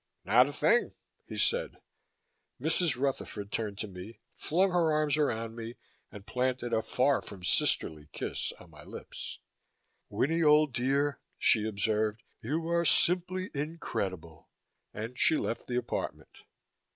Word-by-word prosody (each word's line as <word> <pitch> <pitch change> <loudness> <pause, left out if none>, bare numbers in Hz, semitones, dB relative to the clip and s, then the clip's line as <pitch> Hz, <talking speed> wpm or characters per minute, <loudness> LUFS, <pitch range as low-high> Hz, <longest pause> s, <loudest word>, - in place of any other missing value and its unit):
"Not 125 +6 +6
a - - -4
thing," 160 +12 +2 0.3
he - - -7
said. - - +1 0.8
Mrs. 170 -8 +2
Rutherford 110 -7 -2
turned 105 -3 -2
to 110 - -3
me, 95 +4 -9 0.2
flung 185 +4 +1
her 170 -3 +3
arms 150 -1 +2
around 115 -7 -1
me 115 +1 -6 0.4
and 100 -1 -11
planted 125 -1 -1
a 110 - +3
far 130 +4 +2
from 95 -3 -11
sisterly 75 -4 +1
kiss - - -3
on - - -16
my - - -13
lips. - - -8 0.7
"Winnie, 165 +4 +1
old 150 -2 +5
dear," 140 +4 +1 0.2
she 110 -2 +4
observed, 110 +1 0 0.2
"you 160 +8 -2
are 170 0 +3
simply 180 +2 +2
incredible." 95 - -4 0.4
And 115 +4 -6
she 160 - +4
left 115 - -3
the 125 - -1
apartment. 120 -1 -4
125 Hz, 140 wpm, -30 LUFS, 110-155 Hz, 0.8 s, Not